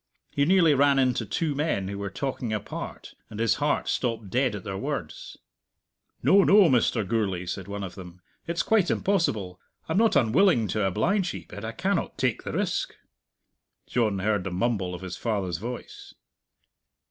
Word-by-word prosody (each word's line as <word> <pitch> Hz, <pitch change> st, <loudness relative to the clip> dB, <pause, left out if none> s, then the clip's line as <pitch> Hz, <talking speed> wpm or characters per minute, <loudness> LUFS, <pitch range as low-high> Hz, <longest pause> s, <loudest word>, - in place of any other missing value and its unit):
He 140 Hz, -, +1 dB
nearly 170 Hz, -2 st, +5 dB
ran 140 Hz, 0 st, +4 dB
into 125 Hz, -4 st, +1 dB
two 155 Hz, -, -1 dB
men 140 Hz, -10 st, -1 dB
who 100 Hz, +1 st, -5 dB
were 100 Hz, 0 st, -3 dB
talking 125 Hz, +1 st, -3 dB
apart, 105 Hz, -2 st, -6 dB, 0.2 s
and 105 Hz, -, -8 dB
his 115 Hz, -4 st, +2 dB
heart -, -, +1 dB
stopped 115 Hz, -5 st, -2 dB
dead 125 Hz, -3 st, +1 dB
at 100 Hz, -, -7 dB
their 95 Hz, -, -5 dB
words. 95 Hz, -, -5 dB, 0.9 s
"No, 200 Hz, 0 st, +6 dB
no, 200 Hz, -1 st, +6 dB
Mr. 115 Hz, -4 st, +2 dB
Gourlay," 95 Hz, -5 st, -1 dB
said 90 Hz, +1 st, -5 dB
one 100 Hz, 0 st, -5 dB
of 95 Hz, -, -6 dB
them; 90 Hz, -2 st, -11 dB, 0.3 s
"it's 170 Hz, 0 st, 0 dB
quite 210 Hz, -6 st, +2 dB
impossible. 110 Hz, -, 0 dB, 0.3 s
I'm 160 Hz, +5 st, +1 dB
not 225 Hz, 0 st, +3 dB
unwilling 120 Hz, -, +4 dB
to 105 Hz, -2 st, 0 dB
oblige 180 Hz, -, 0 dB
ye, -, -, -8 dB
but 100 Hz, -, -9 dB
I 110 Hz, -, -3 dB
cannot 190 Hz, +3 st, -1 dB
take 125 Hz, -4 st, 0 dB
the -, -, -6 dB
risk." -, -, -1 dB, 0.9 s
John 110 Hz, -5 st, 0 dB
heard 105 Hz, 0 st, 0 dB
the 95 Hz, -, -3 dB
mumble 95 Hz, -1 st, -1 dB
of 90 Hz, -, -9 dB
his 90 Hz, -2 st, -6 dB
father's 95 Hz, -7 st, -2 dB
voice. 120 Hz, +4 st, -8 dB
115 Hz, 170 wpm, -26 LUFS, 100-145 Hz, 0.9 s, No